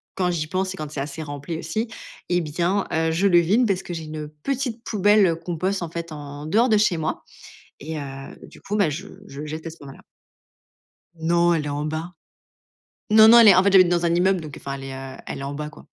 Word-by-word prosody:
quand 180 -2 0
j'y 155 -3 -2
pense 185 +2 -2
et - - -10
quand 155 -3 -5
c'est 150 - -5
assez 145 +3 -5
rempli 145 +2 -6
aussi 215 +9 -3 0.4
et 175 0 +1
bien, 175 +5 -1
heu, 160 0 +1
je 180 +5 +2
le 175 -3 +5
vide 210 +9 +3
parce 190 -2 -1
que 175 - -6
j'ai 165 -1 -5
une 155 -1 -6
petite 235 - -4
poubelle, 205 -1 +3
heu, 165 - +1
compost, 185 +3 -2
en 170 - -4
fait, 170 0 -6
en 145 -1 -8
dehors 225 +10 +3
de 215 - +4
chez 205 -5 +2
moi 155 -1 -3 0.6
et 160 +2 -6
heu, 135 -1 -8
du - - -15
coup, 205 - -4
ben, 200 -5 +3
heu, - - -1
je 180 +7 -6 0.2
je 140 - -10
le 155 - -6
jette 155 +2 -6
ce 165 - -14
moment-là. 135 -1 -12 1.1
Non, 170 +1 +2
elle 155 -3 -1
est - - -3
en 145 +1 -3
bas. 160 +3 -4 1.0
Non, 220 0 +8
non, 235 +1 +9
elle 225 -2 +9
est 195 - +8
en 185 - +5
fait, 200 - +3
j'habite 185 -2 +6
dans 175 -1 +1
un 170 0 +2
immeuble, 185 0 +2
donc 150 -3 -9
enfin, 140 - -6
elle 135 - -8
est, 135 - -6
heu, 135 0 -8
elle - - -5
est - - -6
en 140 +1 -4
bas, 150 +1 -5
quoi, 150 - -16
165 Hz, 250 wpm, -23 LUFS, 150-190 Hz, 1.1 s, non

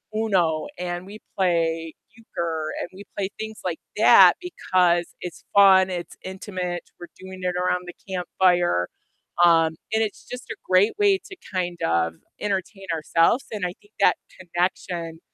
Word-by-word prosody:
Uno 185 -8 +1
and 175 0 -4
we 210 +2 -9 0.2
play 165 -3 +1 0.2
Euchre 165 -8 -4
and - - -4
we 195 +2 -10
play 195 -1 -1
things 220 0 -6
like 175 -3 -2 0.2
that - - +8
because 180 - +1 0.2
it's 180 -2 -7
fun, 190 -2 +7
it's 175 -1 -5
intimate, 185 -2 -4 0.2
we're 175 - -9
doing 185 0 -10
it 180 -1 -1
around 180 0 0
the 175 - -7
campfire, 180 - +1 0.6
um, 165 -2 +5 0.2
and 220 - +2
it's 210 - -5
just 250 0 -8
a - - -4
great 185 +4 +4
way 400 -2 +4
to 385 - -9 0.2
kind 175 -2 -2
of 85 0 +1 0.2
entertain 195 0 -3
ourselves 165 - +2
and 205 -4 -2
I 175 - -6
think 205 +1 -25
that - - +4 0.2
connection 175 -2 -3
180 Hz, 155 wpm, -24 LUFS, 170-195 Hz, 0.6 s, that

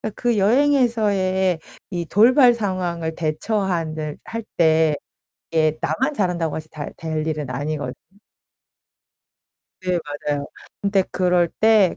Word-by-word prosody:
그 240 -3 0
여행에서의 205 - +2 0.3
이 175 -2 -2
돌발 245 +4 +6
상황을 175 -6 -2
대처하는 160 -2 -2
할 230 0 -5
때 160 -2 +4 0.6
이게 155 -1 +2
나만 265 +6 0
잘한다고 175 -5 0
해서 155 0 -7
다 150 -2 -6
될 160 -1 -3
일은 150 -3 -2
아니거든. 145 +3 -3 1.9
네, 180 -1 0 0.3
맞아요. 145 -1 0 0.4
근데 200 -1 +2
그럴 180 -2 +2
때 215 -3 +3
180 Hz, 225 characters per minute, -22 LUFS, 160-210 Hz, 1.9 s, 돌발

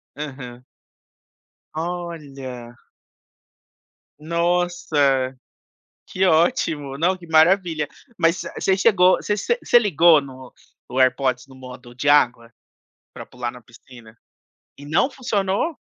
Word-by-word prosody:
Aham. 130 -4 -8 1.1
Olha. 145 -8 -7 1.4
Nossa, 165 -5 0 0.7
que 185 - -1
ótimo. 155 -4 +1
Não, 180 +4 +1
que 180 -2 -14
maravilha. 160 -1 +3 0.3
Mas 165 +3 +2 0.2
você 190 - +1
chegou 190 -3 +4
você 210 - -2
você 475 - -1
você 240 - +5
ligou 170 -7 +4
no 130 -2 -12 0.4
o 125 - -5
AirPods 130 0 +1
no 135 - -15
modo 125 -1 -12
de 130 +4 -3
água 120 -5 +3 0.6
pra - - -10
pular 120 -1 -5
na 125 0 -14
piscina. 115 0 -17 0.6
E 145 - -13
não 160 - +1
funcionou? 220 - -2
150 Hz, 110 wpm, -21 LUFS, 130-175 Hz, 1.4 s, você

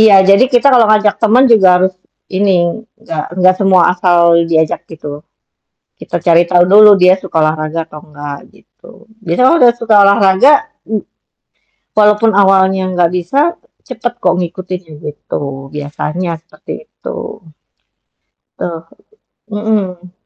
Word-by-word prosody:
Iya 220 -2 +6
jadi 200 +6 +5
kita 245 +3 +3
kalau 235 -3 +4
ngajak 210 -1 +2
teman 230 +4 +3
juga 200 -5 +4
harus 185 +1 0 0.4
ini, 195 +1 0 0.5
gak 160 -2 -4 0.2
gak 185 0 +4
semua 190 -2 +3
asal 170 -2 +2
diajak 160 -1 0
gitu, 150 -2 -9 0.8
kita - - -6
cari 170 0 +4
tahu 175 -1 +4
dulu 210 +1 +7
dia 180 +1 +6
suka 190 -4 -7
olahraga 155 +1 -2
atau 150 -1 -12
enggak 145 -1 -9 0.2
gitu. 230 - -20 0.2
Biasanya 175 +9 +1
kalau 335 - +3
udah 240 -1 +6
suka 230 -2 0
olahraga 200 +6 +4 0.4
m 215 -1 -1 1.0
walaupun 210 +1 +3
awalnya 190 -1 +2 0.2
gak 170 -1 +2
bisa 180 +10 -3 0.5
cepet 240 -1 -5
kok - - +1
ngikutin 180 +1 -6 0.2
gitu. 140 -2 -7
Biasanya 150 +4 -5
seperti 165 -2 -12 0.2
itu. 465 - -9 1.1
Oh, 165 -1 -6 0.6
mhm. 205 -4 -4
185 Hz, 130 wpm, -12 LUFS, 165-210 Hz, 1.1 s, dulu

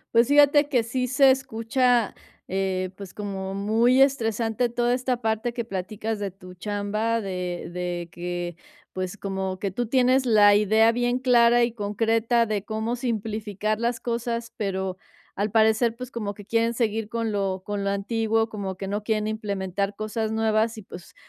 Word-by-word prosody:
Pues 235 0 +6
fíjate 290 0 +5
que 250 -5 +2
sí 250 +2 -2
se 270 +1 +5
escucha, 245 -2 +1 0.4
eh, 190 -1 -1
pues 195 -3 -9
como 195 -2 -5
muy 225 +6 +3
estresante 230 -2 +1
toda 240 +1 0
esta 250 -1 -1
parte 220 +2 -1
que 235 -1 -3
platicas 210 +2 -4
de 200 -2 -3
tu 185 -1 -13
chamba, 210 +4 -1
de 180 -3 -4
de 175 -1 -4
que, 175 -1 -5 0.3
pues 185 +1 -4
como 190 -2 -3
que 195 0 -3
tú 240 +5 -2
tienes 255 +1 +3
la 210 -3 +6
idea 220 +2 +4
bien 245 +1 0
clara 240 -2 +5
y 235 - +1
concreta 225 +2 +1
de 210 -2 -2
cómo 220 +2 -2
simplificar 215 -2 -2
las 235 0 -1
cosas, 235 0 -3
pero 190 -3 -2 0.4
al 205 +2 0
parecer, 220 +2 +3
pues 250 +1 -8
como 210 -3 -4
que 205 - -12
quieren 230 +1 +1
seguir 225 -2 -1
con 230 -1 -2
lo 190 -2 -2
con 205 -1 -3
lo - - +1
antiguo, 225 +2 0
como 195 -3 -5
que 195 +1 -6
no 205 +1 -2
quieren 215 -1 0
implementar 200 -2 -2
cosas 220 0 -3
nuevas, 220 0 +1
y - - -7
pues, 175 -2 -12
220 Hz, 170 wpm, -25 LUFS, 200-235 Hz, 0.4 s, Pues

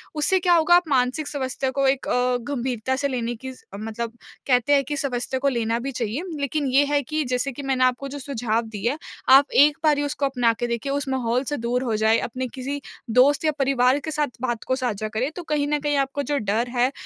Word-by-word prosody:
उससे 340 +5 +2
क्या 355 0 +3
होगा 335 +1 +5
आप 350 -2 +3
मानसिक 260 +2 +1
समस्या 265 -2 -2
को 275 0 +1
एक 265 0 0
अ, 250 0 +1
गंभीरता 260 -1 -1
से 280 +1 0
लेने 240 -2 -2
की 260 - -5 0.3
मतलब 230 +2 -5 0.3
कहते 250 +2 +3
हैं 280 -1 +4
कि 290 +1 -3
समस्या 260 -2 -2
को 280 +1 +2
लेना 230 -2 -1
भी 275 +3 -4
चाहिए। 240 - -3 0.2
लेकिन 285 0 -1
ये 280 +2 +5
है 290 0 +1
कि 310 +3 -2
जैसे 250 +2 -1
कि 285 - -5
मैंने 265 -1 +1
आपको 255 +2 +1
जो 285 +1 -6
सुझाव 240 -4 -1
दिए 220 +1 -2
हैं, 290 - -4 0.3
आप 275 +2 +7
एक 290 +1 +6
बारी 295 -2 +3
उसको 290 0 -1
अपना 245 -4 +2
के 240 +2 -3
देखिए, 235 +3 -2
उस 280 0 -2
माहौल 250 -1 0
से 290 - -2
दूर 245 +2 -1
हो 225 -3 -1
जाएँ, 220 +1 +3
अपने 255 +2 -4
किसी 275 +2 -4 0.3
दोस्त 275 +6 +4
या 310 - +4
परिवार 265 0 +3
के 315 +2 -5
साथ 300 -1 0
बात 240 -3 -2
को 260 - 0
साझा 225 -5 -2
करें 245 +7 -2
तो 355 - -6
कहीं 300 -2 0
न 295 0 0
कहीं 290 0 0
आपका 280 +1 -4
जो 285 - +2
डर 220 +2 0
है 250 +2 +3
265 Hz, 230 wpm, -23 LUFS, 240-285 Hz, 0.3 s, आप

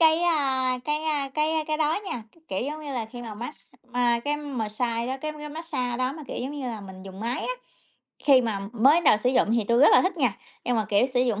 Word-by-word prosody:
cái, 320 0 +5
a, 265 -6 +2
cái, 300 +1 -1
a, 290 -3 0
cái 310 +1 +1
cái 305 0 0
đó 310 +4 +1
nha, 240 - -4
cái 330 - -24
kiểu, 195 +6 -2
giống 305 0 -7
như 285 - -5
là, 240 -3 -2
khi 240 +2 -9
mà 225 -3 -7
mát 240 +7 -6
x - - -20 0.3
ma 240 -1 +2
cái 295 +1 0
mờ 275 -7 -3
sai 230 +2 -1
đó 260 - -2
cái 305 0 -3
cái 300 0 -8
mát-xa 290 -6 -3
đó 255 +2 0
mà, 310 - -9
kiểu, - - -6
giống 260 - -3
như 285 -3 -4
là, 225 -3 -4
mình 190 -1 -10
dùng 195 +1 -10
máy 235 +2 -2
á, - - -2 0.7
khi 270 -3 +7
mà 215 -4 -2
mới 260 +7 +5
đến 345 - +1
đầu - - +7
sử 245 +4 +1
dụng 235 -4 +3
thì 230 -2 +2
tôi 235 +1 +4
rất 295 - +8
là - - +7
thích 370 0 0
nha, 250 -10 +1 0.3
nhưng 245 -1 +1
mà, 220 - +1
kiểu, 210 +5 +4
sử 250 - +4
dụng 230 -5 +1
255 Hz, 280 wpm, -26 LUFS, 235-300 Hz, 0.7 s, rất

